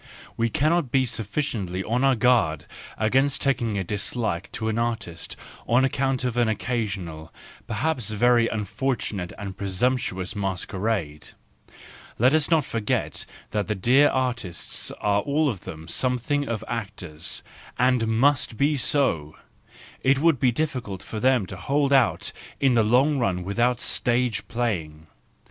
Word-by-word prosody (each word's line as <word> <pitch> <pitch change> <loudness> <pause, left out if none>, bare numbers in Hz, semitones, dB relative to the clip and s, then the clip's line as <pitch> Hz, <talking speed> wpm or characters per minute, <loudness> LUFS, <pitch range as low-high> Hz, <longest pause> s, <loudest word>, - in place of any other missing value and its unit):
We 115 0 +1
cannot 155 +2 +1
be 130 -1 +3
sufficiently 105 -5 -3
on 120 +5 0
our 135 -1 +4
guard 110 -11 +2 0.3
against 135 +6 +2
taking 120 -6 0
a 95 - 0
dislike 105 -1 -3
to 110 - -3
an 110 +1 0
artist 110 -8 -3 0.3
on 125 +3 +4
account 135 -1 0
of 125 -1 -1
an 120 -1 +3
occasional, 100 -8 -3 0.4
perhaps 120 0 -1
very 115 +2 +3
unfortunate 105 -3 -2
and 100 -2 -6
presumptuous 100 0 -1
masquerade; 95 -4 -2 0.9
let 130 +5 +4
us 155 -2 +2
not 160 -4 +3
forget 110 -3 -2 0.2
that 105 -1 -1
the 105 - -1
dear 130 +9 +5
artists 120 -9 -2
are 105 0 +2
all 150 +4 +1
of 105 -10 -3
them 80 -3 -8
something 130 +3 0
of 110 -2 -3
actors—and 110 +5 -2
must 120 +1 +2
be 145 +1 +2
so; 120 - +1 0.7
it 135 +1 +3
would 155 -2 +3
be 125 0 +3
difficult 125 - -3
for 110 - -5
them 125 -3 +3
to 95 - -8
hold 140 +5 +1
out 130 -4 +3 0.3
in 135 -2 +3
the 115 - +4
long 130 +7 +3
run 95 -7 0
without 120 +6 +1
stage¬ 120 -2 +1
playing. 85 -10 -3
115 Hz, 140 wpm, -25 LUFS, 100-130 Hz, 0.9 s, dear